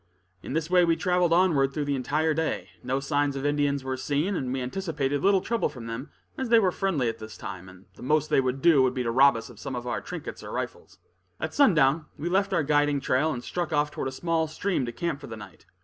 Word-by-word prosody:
In - - -6
this 160 0 -1
way 180 0 +4
we 165 -1 +3
traveled 180 -1 +1
onward 165 -6 +3
through 150 -2 -1
the 145 - 0
entire 150 +5 0
day. 155 - -2
No 130 +2 -1
signs 145 0 0
of 135 +1 -4
Indians 145 -1 +1
were 130 0 -2
seen, 145 +9 -1
and 130 -6 -2
we 135 - -1
anticipated 145 0 -2
little 195 -1 +4
trouble 230 -3 0
from 125 -5 -10
them, 115 +5 -6 0.3
as 260 -2 -2
they 230 - +6
were 195 -5 +3
friendly 175 -10 0
at 115 0 -3
this 110 0 -9
time, 95 0 -8
and 95 +1 -16
the - - -16
most 150 +3 +1
they - - +5
would 130 +1 -2
do 165 -5 +6
would 130 -1 +2
be 125 - -1
to 115 - -1
rob 135 +2 +6
us 115 - -7
of 110 - -15
some 135 +1 -5
of 120 0 -5
our 120 - -2
trinkets - - -7
or - - -7
rifles. - - -6 0.4
At 155 - -3
sundown 155 - +4
we 160 +4 -3
left 195 +2 +1
our 170 -5 +2
guiding 145 0 +2
trail 135 +4 +1
and 120 -4 -5
struck 175 -2 -3
off 150 -1 +1
toward - - -3
a - - -3
small 165 +3 0
stream 155 -4 -1
to - - -3
camp 160 +3 -3
for 140 - -8
the 110 -2 -7
night. 105 - -13
145 Hz, 255 wpm, -27 LUFS, 130-165 Hz, 0.4 s, they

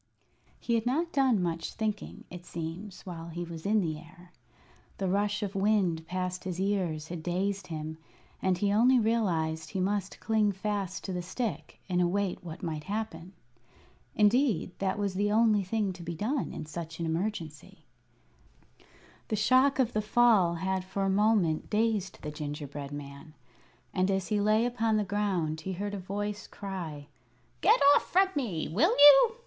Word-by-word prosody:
He 235 - -2
had 230 0 +1
not 325 +7 0
done 260 -9 +3
much 165 -1 -3
thinking, 215 -2 -4
it 180 -1 -8
seems, 175 +4 -7
while 170 -3 -7
he 170 +1 -5
was 165 0 -7
in 215 0 +3
the 155 -4 -2
air. 175 +2 -16 0.7
The 195 - -1
rush 205 +2 0
of 200 -1 -3
wind 195 -5 +1
past 185 0 -3
his 180 -1 -4
ears 180 -6 -1
had 170 -2 -5
dazed 190 +3 -2
him, 155 -1 -6 0.4
and 185 -1 +1
he 200 +2 +1
only 245 +5 +5
realized 170 -9 0
he 190 - -3
must 195 +1 -1
cling 215 -2 +2
fast 195 -1 -3
to 190 - -4
the 180 - -2
stick 175 - -4
and 180 -1 +1
await 185 +2 0
what 165 +2 -8
might 155 -3 -4
happen. 195 -4 -4 0.8
Indeed, 215 - +3
that 190 0 0
was 200 -2 -1
the 205 +2 0
only 215 -1 +4
thing 200 0 -1
to 180 - -11
be 170 0 -5
done 245 - -1
in 155 - -6
such 160 +1 -7
an 170 - -1
emergency. 165 -2 -4 1.4
The 215 - -1
shock 255 +6 +4
of 250 -3 +1
the 215 - +1
fall 210 -5 +4
had 190 +2 -1
for 195 +1 -3
a 195 - +2
moment 200 -6 +2
dazed 215 -3 0
the 150 - -4
gingerbread 145 -1 -6
man; 145 +2 -9 0.6
and 185 +1 +1
as 190 0 -1
he 210 -2 +1
lay 215 +3 +3
upon 230 -3 +1
the 210 - +1
ground 185 -6 -1
he 190 +3 -4
heard 205 +3 -4
a 200 - -3
voice 205 +2 -4
cry: 175 -8 -6 0.6
"Get - - +5 0.2
off - - 0
from 380 +2 +4
me! 210 - -2
Will 310 - +2
you? 290 - +8
190 Hz, 170 wpm, -29 LUFS, 170-215 Hz, 1.4 s, you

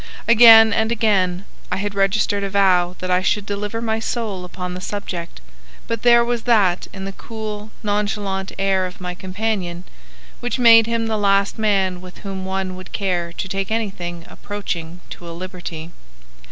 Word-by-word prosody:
Again 225 -1 +8
and 220 +2 +1
again 200 -5 +1 0.3
I - - 0
had 205 +1 -3
registered 200 +1 +1
a 200 - -2
vow 185 -3 +3
that 185 0 -4
I 180 0 +3
should 200 +2 0
deliver 205 +3 -4
my 220 -1 0
soul 220 -5 -3
upon 180 0 -6
the 180 - -6
subject, 180 - -6 0.4
but 230 -1 -3
there 235 -1 +5
was 240 -1 -1
that 200 -7 +3
in 190 -1 -7
the 195 - -4
cool, 215 0 -7
nonchalant 205 -2 -2
air 190 -1 +1
of 180 - -12
my 180 -1 -5
companion 185 -2 -3 0.6
which 245 +1 -2
made 230 -2 +7
him 230 -1 -1
the 220 -1 -1
last 200 +1 +2
man 195 -4 +1
with 180 -1 -12
whom 190 -1 -5
one 190 -1 -3
would 185 0 -11
care 175 -4 -1
to 190 - -4
take 195 0 -3
anything 180 -6 -3
approaching 180 -4 -6
to 170 - -9
a - - -7
liberty. 175 -3 -7
195 Hz, 170 wpm, -20 LUFS, 185-220 Hz, 0.6 s, Again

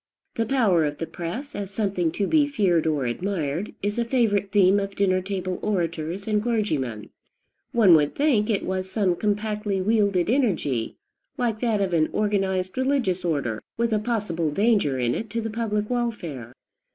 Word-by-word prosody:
"The 225 -1 -1
power 220 -11 +3
of 145 -1 -2
the 165 - -3
press," 225 - -6
as 200 -2 -4
something 195 -5 -1
to 200 - 0
be 295 +5 +3
feared 185 - +1
or 150 -4 0
admired, 165 - -2
is 205 +3 -1
a - - +2
favorite 220 -5 +1
theme 200 0 +5
of 195 0 -4
dinner 185 -2 +2
table 185 -1 -3
orators 175 -1 -2
and 210 -1 +1
clergymen. 155 - -2 0.6
One 215 -7 +6
would 150 -2 +3
think 260 -8 +2
it 205 -3 0
was 185 0 -2
some 190 -2 +1
compactly 210 0 -1
wielded 200 -3 +2
energy, 180 - 0 0.4
like 235 -4 -1
that 225 -4 +1
of 190 -2 0
an 155 -2 +2
organized 195 -1 0
religious 260 -9 +1
order, 140 -10 -1 0.2
with 235 -1 +1
a 215 - +2
possible 205 -8 -1
danger 200 - +2
in 120 -1 +1
it 225 - -4
to 230 +3 -2
the 225 -1 -3
public 210 -2 -1
welfare. 195 - -3
200 Hz, 170 wpm, -24 LUFS, 170-220 Hz, 0.6 s, One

